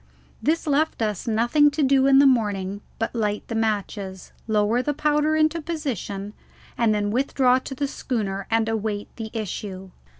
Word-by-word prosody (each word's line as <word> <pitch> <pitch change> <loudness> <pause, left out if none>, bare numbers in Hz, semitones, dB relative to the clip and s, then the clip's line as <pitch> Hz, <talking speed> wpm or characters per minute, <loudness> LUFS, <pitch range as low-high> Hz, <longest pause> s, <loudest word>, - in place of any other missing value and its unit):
This 320 +3 +1
left 305 +1 +1
us 210 -2 -2
nothing 240 +7 +4
to 295 +1 -1
do 270 0 +4
in 270 -1 +6
the 280 - +7
morning 205 -6 +1 0.2
but 225 - -2
light 210 -3 -2
the - - -3
matches, 205 -4 -2 0.2
lower 215 +2 +2
the 290 +2 -2
powder 300 +1 +2
into 315 +1 +2
position, 240 - -4 0.4
and 230 -2 +2
then 205 -1 0
withdraw 255 +1 +2
to 270 +1 -7
the 280 +2 -1
schooner 200 -8 -3
and 225 0 +2
await 215 -2 -3
the 225 -2 -5
issue. 195 -3 -5
225 Hz, 165 wpm, -24 LUFS, 205-275 Hz, 0.4 s, the